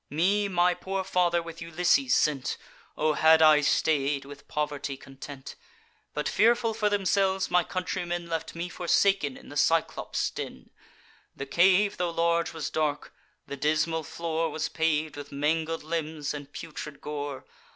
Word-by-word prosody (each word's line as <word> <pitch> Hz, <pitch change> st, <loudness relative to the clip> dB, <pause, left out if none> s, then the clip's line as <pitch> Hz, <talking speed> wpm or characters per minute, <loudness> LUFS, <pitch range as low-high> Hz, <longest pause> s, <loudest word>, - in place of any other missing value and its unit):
Me 195 Hz, +7 st, +2 dB
my 180 Hz, -1 st, +3 dB
poor 190 Hz, +2 st, -3 dB
father 175 Hz, -2 st, +1 dB
with 165 Hz, 0 st, -9 dB
Ulysses 180 Hz, -, +2 dB
sent; 145 Hz, -4 st, +1 dB, 0.4 s
(O 155 Hz, 0 st, +2 dB
had 160 Hz, +1 st, +6 dB
I 155 Hz, -2 st, +7 dB
stay'd, 145 Hz, -1 st, +1 dB
with 140 Hz, 0 st, -12 dB
poverty 145 Hz, -2 st, -3 dB
content!) 135 Hz, 0 st, -10 dB, 0.6 s
But, 150 Hz, -, -1 dB
fearful 230 Hz, +1 st, +3 dB
for 210 Hz, -1 st, +1 dB
themselves, 195 Hz, -1 st, +1 dB
my 180 Hz, -1 st, +4 dB
countrymen 175 Hz, -1 st, -3 dB
Left 165 Hz, -1 st, -4 dB
me 170 Hz, +1 st, -3 dB
forsaken 175 Hz, -4 st, +1 dB
in -, -, -14 dB
the 145 Hz, -, -10 dB
Cyclops' 165 Hz, +2 st, +1 dB
den. 65 Hz, -, -8 dB, 0.6 s
The 140 Hz, -, -5 dB
cave, 190 Hz, +7 st, +3 dB
tho' 180 Hz, -1 st, 0 dB
large, 170 Hz, 0 st, +1 dB
was 160 Hz, -3 st, -5 dB
dark; 150 Hz, -2 st, -1 dB, 0.3 s
the 140 Hz, -, -6 dB
dismal 155 Hz, +3 st, +1 dB
floor 165 Hz, +1 st, -2 dB
Was 155 Hz, -, -3 dB
pav'd 155 Hz, -1 st, 0 dB
with 145 Hz, 0 st, -8 dB
mangled 160 Hz, +3 st, -1 dB
limbs 155 Hz, -2 st, -3 dB
and 145 Hz, -1 st, -8 dB
putrid 150 Hz, -1 st, -8 dB
gore. 145 Hz, -2 st, -5 dB
160 Hz, 150 wpm, -27 LUFS, 150-180 Hz, 0.6 s, I